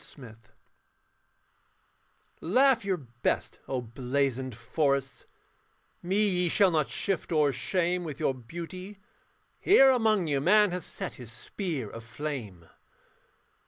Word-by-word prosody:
THE - - -16
LAMP 115 -4 -12
POST 105 - -29 1.9
Laugh 255 +6 +3
your 195 -2 0
best, 120 -6 -3
O 130 -2 -2
blazoned 130 +1 -2
forests, 140 +3 -1 0.8
Me 200 +4 +1
ye 180 -2 +1
shall 195 +1 +4
not 155 -3 +1
shift 195 -3 -2
or 150 -3 +3
shame 175 +7 0
With 155 -4 -6
your 135 - +1
beauty: 175 - -8 0.6
here 270 -9 +6
among 220 -7 +2
you 145 -3 0
Man 210 +5 +5
hath 180 -1 -4
set - - -6
his 120 -2 -9
spear 145 - -5
of 115 +2 -9
flame. 115 - -6
155 Hz, 125 wpm, -28 LUFS, 125-190 Hz, 1.9 s, here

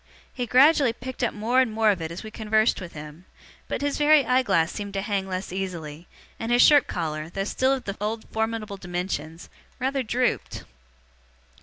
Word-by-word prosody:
He 245 -2 -3
gradually 270 0 +5
picked 255 +1 -7
up 240 - +2
more 235 +5 +2
and 250 -4 0
more 220 0 +3
of 190 -4 -3
it 160 - -3
as 170 - -7
we 215 - -8
conversed 215 -1 +1
with 175 -2 -8
him; 150 +3 -10 0.4
but, - - -3
his 285 0 -1
very 295 -2 +5
eye 255 +2 +3
glass 170 -8 +1
seemed 205 -1 -6
to 195 - -1
hang 200 -2 -2
less 185 -1 -4
easily, 170 -4 -5 0.3
and 225 +1 -3
his 245 0 +6
shirt 290 -2 +6
collar, 155 -2 -3
though 195 +3 -3
still 260 +6 +1
of 265 - -3
the 200 - -5
old 220 +2 -3
formidable 220 -2 -2
dimensions, 175 -3 -5 0.3
rather 265 +1 0
drooped. 250 +1 -1
215 Hz, 190 wpm, -25 LUFS, 180-250 Hz, 0.4 s, his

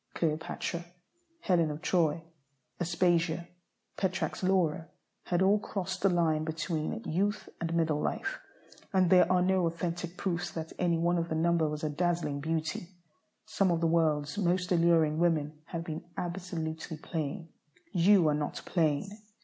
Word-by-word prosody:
Cleopatra, 165 +2 -2 0.6
Helen 170 - +2
of 150 +3 -6
Troy, 165 -3 +2 0.6
Aspasia, 170 -1 +1 0.5
Petrarch's 190 +1 -1
Laura, 180 -4 +1 0.4
had 180 +1 +1
all 200 +2 +4
crossed 190 -3 -4
the 195 - +4
line 165 -3 +2
between 160 +6 -3
youth 200 +6 -1
and 165 0 -2
middle 160 -3 +1
life, 395 - -2 0.5
and 185 -2 +3
there 180 -1 +6
are 180 -1 +4
no 185 -2 +2
authentic 170 +1 -4
proofs 175 -2 -2
that 160 0 -6
any 175 -2 +2
one 170 +1 +2
of 165 0 -2
the 160 - -1
number 165 -1 +2
was 150 0 -5
a 155 - 0
dazzling 170 -2 0
beauty. 160 +2 -2 0.6
Some 200 -3 +1
of 170 -1 +2
the 165 - 0
world's 155 -1 +1
most 180 -1 +1
alluring 165 -3 +4
women 155 -3 +1
have 165 -1 -5
been 160 -2 -5
absolutely 170 -3 -4
plain. 160 +1 -4 0.4
You 185 -1 +5
are - - +2
not 150 0 -2
plain. 155 -2 +1
170 Hz, 150 wpm, -30 LUFS, 160-180 Hz, 0.6 s, there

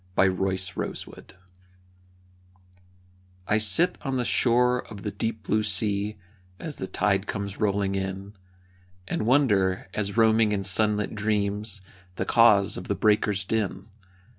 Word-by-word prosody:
A - - +5
Summer 95 - +3 0.5
Reverie - - -6 2.2
I 110 - +2
sit 110 - +3
on 135 -2 -2
the 125 - -1
shore 125 +1 +2
of 100 -3 -10
the 105 - -3
deep 110 0 -4
blue 110 +2 +1
sea 105 0 0 0.4
As 155 -3 -5
the 95 - -5
tide 100 -1 0
comes 100 -1 -5
rolling 100 -2 0
in, 95 +1 -4 0.7
And 110 - -2
wonder, 100 -9 +2
as 100 0 -3
roaming 110 -1 +4
in 100 -1 -2
sunlit 105 +2 +3
dreams, 105 -1 -2 0.3
The - - -3
cause 105 -4 +4
of 90 - -8
the 100 - -1
breakers' 105 -2 +1
din. 105 -1 -3
105 Hz, 135 wpm, -25 LUFS, 100-110 Hz, 2.2 s, A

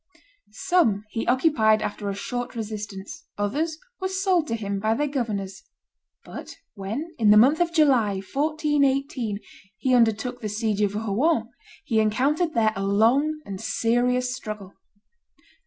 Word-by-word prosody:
Some 230 - +1
he 225 - -3
occupied 240 -5 +3
after 205 0 -4
a 200 - -3
short 245 +4 -4
resistance, 210 +6 -6
others 300 +11 -1 0.2
were 375 - -1
sold 375 -3 +1
to 230 - -1
him 200 -3 -3
by 220 +2 +1
their 295 - 0
governors; 205 -8 -3 0.6
but - - -9 0.2
when, 225 - -5
in 215 -2 +4
the 210 - +8
month 270 +8 +5
of 345 -1 +2
July, 270 - +3
1418, 275 -1 0 0.4
he 255 +4 0
undertook 240 +1 +2
the 215 - -3
siege 210 -1 -1
of 205 -1 +1
Rouen, 225 +4 0 0.4
he 225 - +1
encountered 275 +10 +1
there 220 -2 +3
a 195 - -3
long 250 +10 +2
and 195 -1 -6
serious 250 +2 +1
struggle. 210 -5 -7
230 Hz, 140 wpm, -24 LUFS, 210-290 Hz, 0.6 s, the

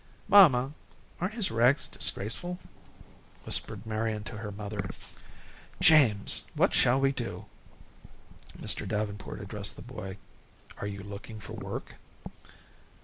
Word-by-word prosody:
"Mamma, 150 -10 +7 0.5
aren't 185 +5 -2
his 215 -5 0
rags 120 +5 +3
disgraceful?" 175 - -1 0.9
whispered - - -1
Marian 110 -1 -2
to 110 0 -7
her 105 -2 -5
mother. 100 -1 -5 0.9
"James, 130 -11 +5
what - - +3
shall 125 +2 +5
we 135 0 +3
do?" 120 -4 -5 1.1
Mr. - - -1
Davenport 105 -1 -3
addressed 100 0 -1
the - - -10
boy. 105 -6 -7 0.6
"Are 100 - -3
you 100 -1 -6
looking 105 +2 -8
for 105 - -9
work?" - - -6
110 Hz, 115 wpm, -29 LUFS, 105-135 Hz, 1.1 s, Mamma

